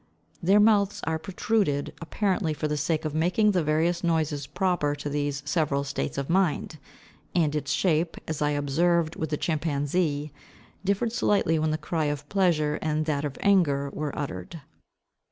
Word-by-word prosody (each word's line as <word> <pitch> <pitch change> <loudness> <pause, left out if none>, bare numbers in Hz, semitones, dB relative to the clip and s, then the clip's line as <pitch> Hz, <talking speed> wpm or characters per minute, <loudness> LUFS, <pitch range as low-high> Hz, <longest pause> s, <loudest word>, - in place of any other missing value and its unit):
Their 195 +4 +5
mouths 205 -2 +3
are 160 -1 -1
protruded 175 -3 0
apparently 180 -2 -1
for 155 - -2
the 150 - -1
sake 155 +2 -1
of 155 - -2
making 180 +7 +3
the 180 -4 +1
various 160 +4 +1
noises 155 -4 0
proper 150 -2 0
to 145 0 -5
these 145 -1 -2
several 145 -2 0
states 140 0 -3
of 140 -1 -2
mind; 170 -3 0 0.6
and 155 -4 +2
its 145 -1 -2
shape, 165 +1 +1
as 160 -2 -3
I 150 - +2
observed 155 +3 +1
with 160 - -3
the 150 - -1
chimpanzee, 150 -1 -1 0.5
differed 200 +4 0
slightly 200 -8 +2
when 155 0 +1
the 155 - 0
cry 155 0 -2
of 145 0 -3
pleasure 165 -6 +2
and 155 0 0
that 150 -2 -1
of 145 -2 -4
anger 145 -9 +3
were 150 -2 -4
uttered. 140 - -5
155 Hz, 165 wpm, -26 LUFS, 145-175 Hz, 0.6 s, Their